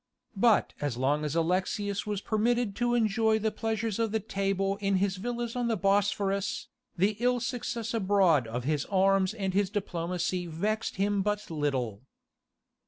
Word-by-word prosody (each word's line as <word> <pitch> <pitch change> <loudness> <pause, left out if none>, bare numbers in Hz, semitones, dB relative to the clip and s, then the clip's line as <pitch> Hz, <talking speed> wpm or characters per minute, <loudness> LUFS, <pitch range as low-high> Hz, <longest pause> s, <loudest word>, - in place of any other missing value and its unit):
But 220 +1 +3
as 145 -5 -2
long 145 +4 +1
as 150 0 -2
Alexius 190 +5 0
was 205 -2 -2
permitted 225 0 0
to 240 0 +1
enjoy 220 -1 +2
the 220 0 0
pleasures 225 -1 -2
of 225 -2 +1
the 220 - +1
table 195 -1 -1
in 200 -1 0
his 190 0 +1
villas 240 +3 -3
on 245 -1 0
the 225 -2 +1
Bosphorus, 195 0 0 0.3
the 200 +4 +2
ill 245 +1 +2
success 235 -1 -3
abroad 190 - +3
of 120 +2 -4
his 145 +1 0
arms 195 +1 +2
and 195 -3 -2
his 200 0 +2
diplomacy 180 -2 -2
vexed 210 +7 -2
him 200 +1 +1
but 210 -2 -2
little. 130 -9 -1
200 Hz, 160 wpm, -29 LUFS, 180-220 Hz, 0.3 s, But